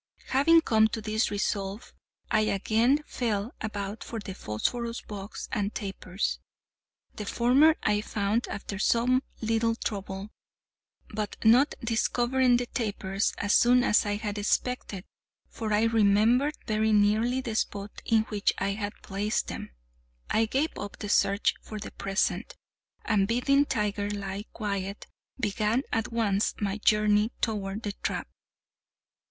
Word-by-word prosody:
Having 325 +5 +5
come 220 -7 +4
to 220 - -4
this 215 +1 0
resolve, 200 +1 -3 0.4
I - - +4
again 225 +7 +2
felt 220 -2 -2
about 205 -1 -4
for 230 - -6
the 200 -2 -6
phosphorus 230 - -3
box 205 0 -7
and 205 0 -2
tapers. 195 -2 -3 0.8
The 210 - -4
former 270 +9 +4
I 210 0 +2
found 210 +2 -1
after 200 -1 -5
some 250 +4 +3 0.2
little 225 0 +1
trouble; 200 -1 -5 0.8
but, 210 -1 -3
not 245 +6 +5
discovering 245 +2 +2
the 245 - -2
tapers 205 -4 -1
as 205 0 0
soon 245 +1 +5
as 210 - +4
I 205 - 0
had 210 -1 -4
expected 205 -2 -1 0.4
(for 220 -2 -5
I 210 +1 +3
remembered 230 +6 +3
very 220 0 +1
nearly 215 +5 +3
the 240 -4 -4
spot 205 -1 -3
in 225 -1 +3
which 210 -2 0
I 195 - 0
had 205 +1 -3
placed 205 +2 -1
them), - - -6 0.6
I 225 +1 +3
gave 275 +7 0
up 205 0 -6
the 205 - -6
search 200 0 +3
for 215 - -8
the 210 - -7
present, 195 0 -1 0.5
and 200 -3 +2
bidding 275 +5 +3
Tiger 210 -5 -1
lie 200 0 -4
quiet, 200 -2 -4 0.3
began 215 +3 0
at 225 0 -1
once 210 -3 +1
my 205 0 -2
journey 210 +1 +3
toward 210 -1 -2
the 205 - -2
trap. - - -4
215 Hz, 140 wpm, -28 LUFS, 205-235 Hz, 0.8 s, Having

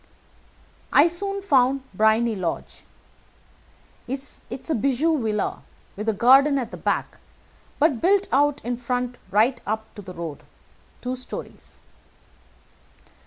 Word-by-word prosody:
I 290 - +7
soon 395 +4 -2
found 270 -6 +3
Briony 220 +3 +3
Lodge. 180 -4 -4 1.2
It 250 - -3 0.4
is 265 - -7
a - - +3
bijou 275 +5 +1
villa, 210 -2 -1 0.3
with 210 +3 -2
a - - +2
garden 270 +6 +5
at 245 -4 -3
the - - -7
back, - - -2 0.6
but 290 -6 +2
built 395 +2 +3
out 290 0 +2
in 245 0 -2
the - - -18
front 250 0 -2
right 235 +5 +2
up 220 +1 -3
to 205 - -9
the 185 -2 -10
road, 165 -4 -6 0.6
two 250 +1 -3
stories. 255 0 -9
250 Hz, 130 wpm, -24 LUFS, 220-285 Hz, 1.2 s, I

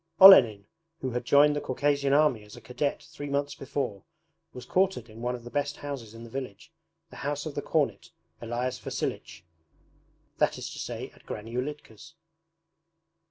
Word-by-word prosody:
Olenin, 120 - +9 0.4
who 130 - -2
had 120 0 -3
joined 145 +3 +5
the 145 - -1
Caucasian 140 +1 0
Army 140 -6 +3
as 105 0 -13
a - - -10
cadet 125 +5 -2
three 145 0 -8
months 140 +1 -1
before, 135 -8 -4 0.5
was 125 - -9
quartered 185 -11 +1
in 110 +1 -11
one 125 +1 -1
of 120 - -10
the 120 - -10
best 145 0 -1
houses 130 -7 -7
in 115 - -10
the 115 - -10
village, 130 0 -7 0.4
the - - -11
house 145 +1 -3
of 155 - -5
the - - -3
cornet, - - -1 0.3
Elias 120 +2 -3
Vasilich 85 +2 -4 1.0
that - - +2
is - - -6
to - - -8
say - - -5
at - - -22
Granny 110 +2 -6
Ulitka's. 145 +1 -6
130 Hz, 170 wpm, -28 LUFS, 115-145 Hz, 1.0 s, Olenin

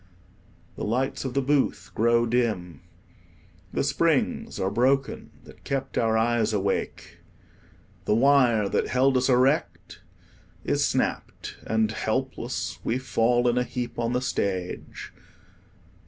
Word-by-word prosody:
The - - -5
lights 130 +5 -1
of 130 - -4
the 140 - +1
booth 140 0 0
grow 120 +1 +3
dim. 110 -9 -1 0.9
The - - -1
springs - - 0
are 95 +1 0
broken 135 +5 0
that - - -16
kept 135 -1 -3
our 110 -1 +2
eyes 115 -1 +1
awake. 100 -1 -3 0.9
The 105 - +2
wire 120 -4 +4
that - - 0
held 130 +1 +2
us 130 +1 +2
erect 130 +4 +1 0.6
is - - +1
snapped, - - -2
and 110 -1 +1
helpless 130 +2 -3
we 115 - 0
fall 120 -1 +1
in 120 +1 +2
a - - +1
heap 125 -1 -5
on 115 +1 -1
the 125 - 0
stage. 95 -7 -3
120 Hz, 125 wpm, -25 LUFS, 110-130 Hz, 0.9 s, wire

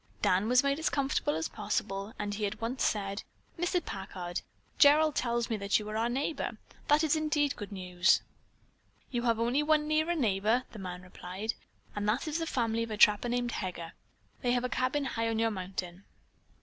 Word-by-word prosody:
Dan 190 +4 +3
was 250 +2 +5
made 280 +1 +1
as 320 - +1
comfortable 270 - 0
as 160 0 -1
possible 200 -1 -3
and 205 0 -3
he 205 0 -1
at 210 +2 -6
once 235 +3 -2
said: 200 -1 0 0.3
"Mr. 350 0 0
Packard, 185 -2 -5 0.4
Gerald 305 +1 +6
tells 235 -2 0
me 225 - -1
that 200 0 +2
you 210 - -5
are 215 - -4
our 225 +2 +1
neighbor. 275 +5 -2 0.3
That 295 +2 +4
is 315 0 +3
indeed 300 -2 +1
good 205 -1 -7
news." 180 -2 +2 0.9
"You 240 -2 0
have 230 -2 +2
only 240 +5 +2
one 300 0 +2
nearer 315 +3 +2
neighbor," 220 - +2
the 220 - -9
man 180 -1 -6
replied, 185 +4 -5 0.4
"and 205 0 0
that 240 +9 0
is 310 +2 -1
the 330 - -2
family 230 -5 0
of 230 - -2
a 215 - -3
trapper 210 +3 +5
named 245 0 0
Heger. 175 -5 -5 0.5
They 245 -2 +2
have 245 0 +1
a 250 - -1
cabin 260 +3 0
high 230 -3 -1
on 225 - -1
your 225 0 +2
mountain." 185 -1 -5
230 Hz, 195 wpm, -31 LUFS, 200-275 Hz, 0.9 s, Gerald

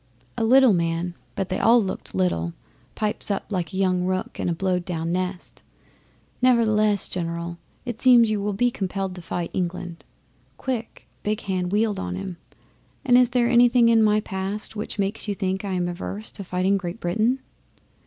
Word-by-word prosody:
A - - -1
little 255 0 +6
man 170 0 -1 0.2
but 190 - -2
they 185 - -1
all 235 +2 +6
looked 190 - -4
little 85 -2 0 0.4
pipes 215 0 -2
up 200 - -1
like 180 -3 -2
a 190 - -5
young 185 -2 +2
rook 185 0 -2
in - - 0
a - - +1
blowed 180 0 0
down 165 -2 -3
nest, 185 0 -4 0.8
"Nevertheless, 215 -5 +3
General, 170 -1 -4 0.3
it 240 -2 -5
seems 240 -3 +6
you 210 -2 0
will 205 0 -1
be 245 +5 +2
compelled 195 -2 -3
to 180 - -8
fight 170 0 -4
England." 175 -1 -4 0.5
Quick 240 -4 -5
Big 210 +2 -1
Hand 185 -2 -2
wheeled 210 0 +1
on 90 0 -3
him, 170 - -6 0.7
"And 245 -2 +5
is 250 -1 +6
there 245 -1 +2
anything 240 0 +5
in 225 -1 +5
my 215 0 +4
past 200 +2 -4
which 210 - -5
makes 200 +2 -2
you 205 - -1
think 190 0 -2
I 195 -2 -3
am 180 -1 0
averse 190 +4 -4
to 200 - -6
fighting 185 +2 +1
Great 180 +2 -5
Britain?" 220 +8 +1
195 Hz, 180 wpm, -24 LUFS, 180-220 Hz, 0.8 s, little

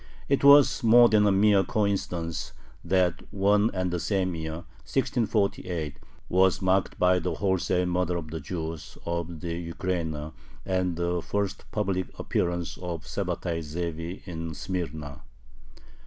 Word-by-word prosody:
It 140 0 +1
was 140 -2 +7
more 120 +1 +7
than 105 -1 +4
a - - +4
mere 100 0 +4
coincidence 90 -5 -2 0.3
that 90 0 +1
one 100 +2 +3
and 95 -2 -1
the 90 - -1
same 95 -1 0
year, 80 0 -5 0.2
1648, 100 - -1 0.3
was 95 0 +3
marked 95 0 +1
by 90 0 +4
the 90 +1 -2
wholesale 95 -2 +1
murder 90 0 0
of 80 -2 -6
the 80 - -4
Jews 80 0 -6
of 85 -1 -3
the 85 0 -3 0.2
Ukraina 80 -4 -3 0.3
and 90 -2 0
the 85 0 -1
first 100 +1 -2
public 95 -3 -1
appearance 85 -1 -2
of 85 -3 -5
Sabbatai 85 -1 -2
Zevi 85 +2 -5
in 80 -3 -5
Smyrna. 75 -6 -5
90 Hz, 135 wpm, -27 LUFS, 85-95 Hz, 0.3 s, was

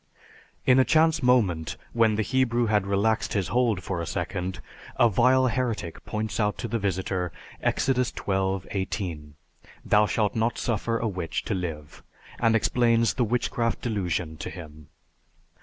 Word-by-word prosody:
In 130 0 +5
a - - +7
chance 160 +3 +3
moment, 95 - +2 0.2
when 115 -2 +3
the 110 - 0
Hebrew 120 -1 +1
had 105 -3 +1
relaxed 100 +3 +1
his 100 -4 -1
hold 120 -6 +1
for 90 -3 -3
a 85 - -4
second, 90 +4 -3 0.4
a 120 - +5
vile 125 +5 +4
heretic 115 -8 -2
points 110 +1 -3
out 105 -1 +1
to - - -4
the 115 0 -2
visitor 95 -2 -2 0.3
(Exodus 125 -2 +1
XXII, 95 -1 -1
18): 90 -7 -4 0.5
"Thou 105 0 +4
shalt 105 -1 0
not 115 +1 0
suffer 115 0 -1
a 115 - -1
witch 90 -6 -3
to 110 - -1
live!" 80 -6 -5 0.4
and 115 -1 +3
explains 115 -1 +2
the 120 - +1
witchcraft 115 0 -1
delusion 90 -8 -2
to - - -5
him. 75 -4 -11
105 Hz, 155 wpm, -26 LUFS, 90-120 Hz, 0.5 s, a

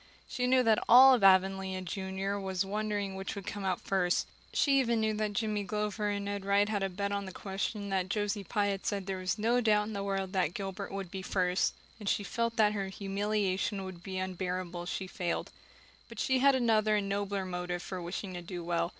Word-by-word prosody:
She 250 0 -1
knew 255 0 +4
that 220 -2 +3
all 255 -1 +9
Avonlea 190 0 +4
junior 190 +2 -3
was 190 -1 -1
wondering 205 -1 -2
which 190 0 -5
would 200 -1 -7
come 205 -1 -5
out 185 -2 0
first; 180 -2 +1 0.3
she 275 -2 +3
even 235 -3 +2
knew 220 0 +1
that 210 -1 -1
Jimmy 210 -1 -1
Glover 210 +1 -2
and 200 0 -2
Ned 200 -1 -3
Wright 200 +1 +3
had 210 -2 -1
a 195 - 0
bet 200 +2 -3
on 200 0 -2
the 190 - -7
question 195 +3 -3
and 200 - -5
that 185 -1 0
Josie 205 -1 -1
Pye 205 +2 0
had 195 -1 -3
said 200 -2 -1
there 190 -1 -3
was 185 +3 -1
no 235 +3 +2
doubt 210 -2 +3
in 215 - -6
the 200 - -3
world 195 -1 -2
that 180 -3 +1
Gilbert 195 0 -5
would 195 -3 -5
be 190 - -5
first; 185 0 +1 0.2
and 205 -2 -2
she 205 - +1
felt 230 +2 -1
that 210 -2 +4
her 200 -2 -2
humiliation 195 0 -1
would 185 -2 -8
be 190 0 -5
unbearable 185 -1 -3
if 175 - -6
she 190 - -3
failed. 180 -2 -3 0.6
But - - -9
she 260 0 +2
had 275 +1 +5
another 220 -4 +3
and 205 -1 0
nobler 200 -1 -1
motive 180 -1 -3
for 185 -2 -5
wishing 185 +2 -5
to 175 - -5
do 175 0 -6
well. 170 0 0
200 Hz, 220 wpm, -31 LUFS, 190-210 Hz, 0.6 s, all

